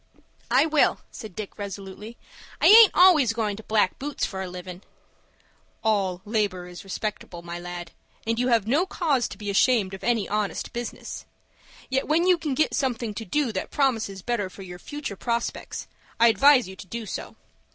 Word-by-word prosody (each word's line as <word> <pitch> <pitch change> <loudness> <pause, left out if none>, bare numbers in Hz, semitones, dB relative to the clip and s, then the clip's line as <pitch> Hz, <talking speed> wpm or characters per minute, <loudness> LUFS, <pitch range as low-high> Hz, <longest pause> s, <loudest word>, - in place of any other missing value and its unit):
"I 260 +5 +4
will," 310 -2 +2
said 215 -7 -9
Dick, 215 -1 -7
resolutely. 200 +3 -7 0.4
"I - - +1
aint 440 0 +10
always 315 -10 +6
goin' 215 -3 -1
to - - -8
black 215 -3 +1
boots 290 +1 -2
for 190 -2 -5
a 190 - -4
livin'." 180 0 -8 1.0
"All 195 -4 0
labor 205 -4 -1
is 180 0 -10
respectable, 195 -3 -5
my 170 0 -6
lad, 175 -1 -7 0.3
and 230 +1 0
you 250 - +1
have 230 -5 +3
no 295 - +2
cause 295 -10 0
to - - -10
be 205 -2 -4
ashamed 200 -2 +3
of 190 - -8
any 235 -4 +1
honest 210 -1 -2
business; 240 0 -6 0.6
yet 265 +1 -1
when 325 +3 +2
you 365 -2 +4
can 300 -5 -2
get 310 - +1
something 240 -5 -1
to 225 +2 -6
do 275 +5 0
that 190 - -4
promises 225 -9 0
better 235 -6 -1
for 195 - -11
your 180 -1 -9
future 290 -2 -6
prospects, 235 +3 -3 0.3
I 235 0 +7
advise 270 -1 +5
you 190 - -9
to 190 - -10
do 230 +3 -5
so. - - -6
220 Hz, 185 wpm, -25 LUFS, 195-260 Hz, 1.0 s, aint